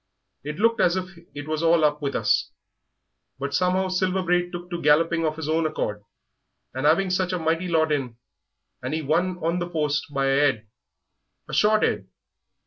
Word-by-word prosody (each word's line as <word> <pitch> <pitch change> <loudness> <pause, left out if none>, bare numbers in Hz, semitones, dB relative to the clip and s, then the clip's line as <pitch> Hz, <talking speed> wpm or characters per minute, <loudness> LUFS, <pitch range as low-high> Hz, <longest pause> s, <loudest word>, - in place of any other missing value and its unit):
It 150 +1 -5
looked 230 +3 +2
as 175 - +3
if 185 0 -4 0.2
it 145 0 -7
was 155 0 -2
all 165 -1 +4
up 150 0 0
with 140 -1 -2
us, - - +1 0.9
but 140 +1 -4
somehow 185 +1 +1
Silver 185 0 0
Braid 175 0 +1
took 175 0 -8
to 175 - -3
galloping 165 +2 +3
of 155 - -2
his 160 -2 -5
own 160 0 +1
accord, 105 -9 -3 0.7
and 130 +3 0
'aving 180 +4 +3
such 185 0 0
a - - 0
mighty 165 +2 -1
lot 160 -2 +2
in 130 -6 -2 0.6
'and 130 +5 -3
he 160 - -3
won 175 +5 0
on 170 +2 0
the 175 0 -3
post 150 -2 -1
by 135 -1 0
a 140 +2 +4
'ead 110 -4 -5 0.8
a - - -9
short 215 0 +3
'ead.... - - 0
165 Hz, 190 wpm, -24 LUFS, 150-180 Hz, 0.9 s, all